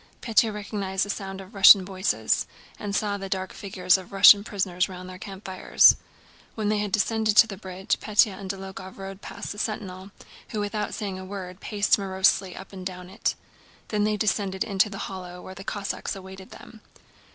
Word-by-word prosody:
Pétya 225 -1 +2
recognized 200 -2 -2
the 205 - -2
sound 195 -2 -6
of 190 +3 -14
Russian 195 -1 +8
voices 190 +1 0 0.3
and 200 -1 -4
saw 205 -1 0
the 195 0 -6
dark 190 0 -3
figures 185 -2 +1
of 185 - -13
Russian 200 +1 +8
prisoners 195 -3 -1
round 185 -1 -8
their 185 0 -10
campfires. 190 -1 +3 0.6
When 215 -2 -1
they 210 0 +1
had 205 -1 -2
descended 220 +1 +1
to - - +9
the 210 -3 -7
bridge 190 -1 -3
Pétya 210 -1 +3
and 195 -1 -8
Dólokhov 190 -1 -7
rode 195 0 -8
past - - -7
the 205 - -7
sentinel, 195 -3 -4 0.4
who 215 - -3
without 210 +1 -2
saying 195 -3 -4
a - - -7
word 185 -1 -7
paced 205 0 +1
morosely 190 -1 +1
up 195 - -11
and 190 -1 -8
down 180 0 -7
it, 205 - -1 0.5
then 210 -1 0
they 210 0 +1
descended 195 -2 0
into 200 0 +1
the 195 - -7
hollow 180 -2 -8
where 185 - -9
the 190 +1 -10
Cossacks 200 0 -4
awaited 190 0 -10
them. 220 - -13
195 Hz, 185 wpm, -25 LUFS, 190-205 Hz, 0.6 s, to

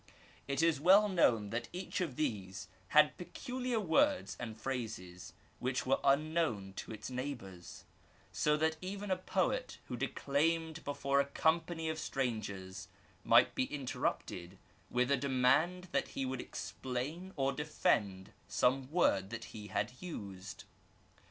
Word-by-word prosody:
It 140 +3 +1
is 165 -4 +3
well 195 +5 +7
known 115 - +3
that 115 +1 -2
each 185 +1 -3
of 160 -8 -2
these 100 -8 -2 0.2
had 150 0 +5
peculiar 250 +6 -3
words 280 - +2
and 110 -2 -6
phrases 95 -9 -5 0.3
which 125 0 -1
were 135 +1 +3
unknown 140 - +2
to - - -6
its 110 +3 -6
neighbours, 120 -9 -6 0.5
so 150 0 +2
that 160 +1 +1
even 195 +2 -4
a - - +4
poet 250 +8 -1
who 125 - -2
declaimed 160 +6 0
before 140 -1 +1
a 140 - +3
company 160 +3 +1
of 160 0 -2
strangers 100 -9 -3 0.4
might - - +6
be 130 - +1
interrupted 100 -9 -3 0.3
with 125 +2 +1
a 140 - +5
demand 145 +7 +2
that - - +1
he 135 - -3
would 130 0 -2
explain 145 +9 -5
or 135 -1 +1
defend 105 -10 0 0.2
some 130 +1 +2
word 100 - +2
that 115 +1 -5
he 105 -2 -7
had 105 +4 -1
used. 100 - -7
135 Hz, 140 wpm, -34 LUFS, 110-165 Hz, 0.5 s, well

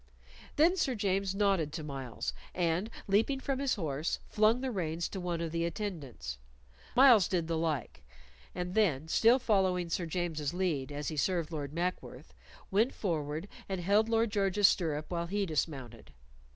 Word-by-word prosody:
Then 340 +5 +4
Sir 265 -7 +1
James 195 -2 0
nodded 195 -7 +2
to 160 -1 -4
Myles, 135 -5 -4 0.2
and 175 +4 0 0.2
leaping 220 +7 +2
from 270 0 -2
his 275 -2 +1
horse, 155 -5 -2
flung 215 +3 +3
the 265 -1 -2
reins 170 -4 -2
to 195 - -5
one 175 -2 -2
of 165 -1 -3
the 165 0 -1
attendants. 155 - -5 0.6
Myles 240 -7 +7
did 175 -3 0
the 165 - -1
like; 155 - -2 0.5
and 180 0 -3
then, 160 -9 +2
still 230 +9 +5
following 190 -7 +1
Sir 170 0 -1
James's 165 -3 -2
lead 160 -7 -1
as 145 0 -3
he 155 - -5
served 170 +1 0
Lord 145 -3 -4
Mackworth, 175 +3 -4 0.4
went 220 +7 +2
forward 155 -2 -2 0.2
and 190 -1 -2
held 205 +5 +3
Lord 225 -1 +2
George's 200 -1 +4
stirrup 155 -5 0
while 170 -1 -2
he 200 +2 0
dismounted. 135 - -4
180 Hz, 165 wpm, -31 LUFS, 155-205 Hz, 0.6 s, Myles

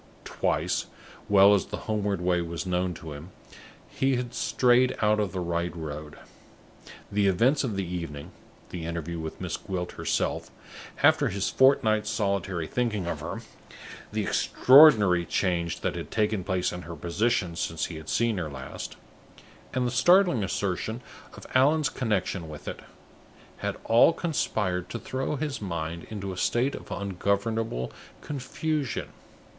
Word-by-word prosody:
Twice, - - -1 0.4
well 100 0 +7
as 100 - +1
the - - -5
homeward 105 -3 -1
way 90 -1 +2
was 85 +1 -4
known 90 -1 -1
to 80 -2 -8
him, 75 +5 -9 0.6
he 135 0 0
had 125 -1 -3
strayed 125 0 +3
out 105 0 +3
of 105 -3 0
the 95 - -3
right 85 0 -2
road. 75 -2 -7 0.9
The 100 0 +2
events 120 +11 +3
of 115 -6 -2
the 95 -1 -1
evening 85 -5 -6 0.4
the 85 -2 -5
interview 85 0 -4
with 80 -1 -6
Miss - - -3
Gwilt 90 -2 -4
herself, - - -1 0.5
after - - +5
his 100 +1 -1
fortnight's 110 -5 +4
solitary 100 -5 -1
thinking 105 -3 -1
of 85 - -3
her; - - -5 0.7
the - - -1
extraordinary 110 - +6
change 85 -1 -1
that - - -1
had - - -6
taken 105 -3 0
place 95 0 0
in 90 - -6
her 85 -1 -8
position 90 +2 0
since 80 -1 -2
he 85 - -7
had 80 0 -9
seen 115 -4 +1
her 80 -3 -3
last; 65 -2 -7 0.8
and 125 0 0
the 120 - 0
startling 175 - +4
assertion 100 +4 -2 0.3
of - - -11
Allan's 145 +3 +4
connection 95 -7 -2
with 75 -1 -10
it - - -5 0.8
had - - -3
all 115 +8 +5
conspired 95 - -1
to - - -4
throw 130 +5 -3
his 145 -3 -3
mind 85 -3 -4
into 100 -3 -5
a - - -9
state 120 +8 +1
of - - -8
ungovernable 100 - -1 0.3
confusion. 145 +1 -3
100 Hz, 150 wpm, -27 LUFS, 85-120 Hz, 0.9 s, well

